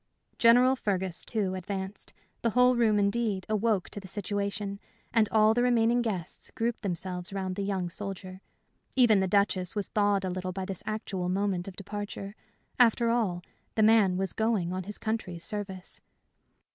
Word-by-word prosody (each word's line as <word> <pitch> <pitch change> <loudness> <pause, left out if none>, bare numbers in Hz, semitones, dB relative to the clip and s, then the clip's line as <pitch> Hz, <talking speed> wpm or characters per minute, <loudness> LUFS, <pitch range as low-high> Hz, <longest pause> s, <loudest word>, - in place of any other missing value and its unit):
General 245 +3 +6
Fergus, 190 -7 -2
too, 205 -5 -1
advanced. 190 +1 -5 0.3
The 230 - +2
whole 250 +3 +4
room, 225 -3 +3
indeed, 200 -1 +1
awoke 215 -2 +1
to - - -5
the 195 - -11
situation, 200 0 -3 0.3
and 220 -3 +3
all 215 0 +5
the 240 - +1
remaining 240 -1 +3
guests 190 -7 -4
grouped 235 +1 -1
themselves 180 -2 -3
round 190 -1 -3
the 200 - -3
young 195 -2 -1
soldier. 190 0 -7 0.5
Even 240 -6 +5
the 190 - +1
Duchess 190 -1 +1
was 205 -2 -2
thawed 205 -2 +2
a - - -1
little 185 0 -3
by 190 0 -4
this 190 -2 -5
actual 195 -4 -3
moment 190 -1 0
of 190 - -7
departure. 205 0 -6 0.5
After 235 -1 +4
all, 195 -7 0 0.3
the 220 - +3
man 210 -4 +5
was 190 0 -1
going 220 -6 0
on 185 -1 -4
his 210 +1 -6
country's 215 -6 -3
service. 195 -3 -5
200 Hz, 165 wpm, -29 LUFS, 185-220 Hz, 0.5 s, General